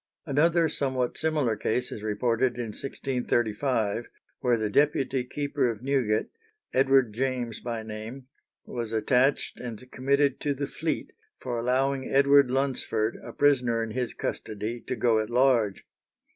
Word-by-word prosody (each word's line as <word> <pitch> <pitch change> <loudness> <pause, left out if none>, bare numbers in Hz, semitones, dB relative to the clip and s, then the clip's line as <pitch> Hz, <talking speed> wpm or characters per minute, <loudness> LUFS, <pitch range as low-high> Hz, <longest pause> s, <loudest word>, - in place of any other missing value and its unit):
Another 165 +3 +3
somewhat 130 -4 -1
similar 150 -8 +1
case 125 +4 -1
is 105 - -6
reported 115 +3 0
in 120 -2 -3
1635, 120 -2 -1 0.3
where 125 -2 +2
the 110 -1 -1
deputy 135 +1 +2
keeper 140 0 -1
of 115 0 -5
Newgate, 130 -6 +1 0.4
Edward 130 -3 +4
James 125 -1 -2
by 115 -2 -4
name, 110 +4 -7 0.4
was 115 -2 -5
attached 125 +5 +1
and 125 +1 -8
committed 140 +1 +1
to 145 -1 -1
the 140 +1 -2
Fleet 155 +3 -3 0.3
for 120 -2 -3
allowing 130 +2 0
Edward 140 -1 +5
Lunsford, 130 -4 0
a - - -8
prisoner 125 -5 +2
in 115 - -5
his 125 +1 -2
custody, 110 +3 -4
to 130 - -1
go 115 -3 +3
at 110 - -2
large. 120 -5 +2
125 Hz, 140 wpm, -27 LUFS, 115-135 Hz, 0.4 s, Edward